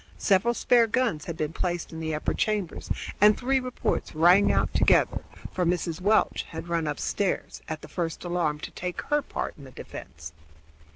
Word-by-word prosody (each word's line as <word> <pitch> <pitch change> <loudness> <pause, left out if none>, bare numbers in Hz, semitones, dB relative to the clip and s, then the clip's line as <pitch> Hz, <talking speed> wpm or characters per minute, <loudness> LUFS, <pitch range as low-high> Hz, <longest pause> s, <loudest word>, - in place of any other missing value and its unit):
Several 210 +4 +2
spare 235 -1 +4
guns 225 -10 0
had 165 -2 -5
been 155 +1 -2
placed 175 -1 -2
in 160 - -7
the 160 -1 -2
upper 150 - -1
chambers, 210 -6 -2 0.3
and 210 0 +7
three 265 +2 +1
reports 255 -9 -2
rang 175 +5 +6
out - - +1
together, - - +3 0.3
for 185 - 0
Mrs. 175 0 -1
Welch 210 +4 +3
had 160 0 -7
run 165 -2 0
upstairs 180 +6 -2
at 155 -1 -5
the - - -8
first 165 0 -3
alarm 175 -4 0
to - - -6
take 180 0 -5
her 295 - +4
part - - -4
in - - -11
the 135 - -11
defense. 75 - -9
175 Hz, 180 wpm, -27 LUFS, 160-210 Hz, 0.3 s, and